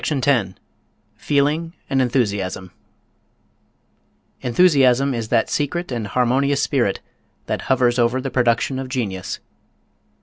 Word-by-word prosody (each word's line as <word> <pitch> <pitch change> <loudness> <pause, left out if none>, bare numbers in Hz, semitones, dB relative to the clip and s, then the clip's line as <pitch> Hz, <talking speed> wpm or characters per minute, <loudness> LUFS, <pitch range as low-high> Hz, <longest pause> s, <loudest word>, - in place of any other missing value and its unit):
] - - -20
CHAPTER 140 -4 -1
X 115 -8 +1 0.7
FEELING 150 +4 0
AND 135 -1 +1
ENTHUSIASM 100 -7 -1 1.7
Enthusiasm 135 -2 +3
is 115 -2 -3
that 115 -1 +2
secret 165 +3 -2
and 115 -4 -3
harmonious 130 +5 +1
spirit 120 -9 0 0.4
that - - -3
hovers 125 -1 +2
over 120 +2 +2
the 135 0 -4
production 125 +1 +1
of 135 -1 -6
genius. 100 -8 -3
130 Hz, 115 wpm, -21 LUFS, 115-140 Hz, 1.7 s, Enthusiasm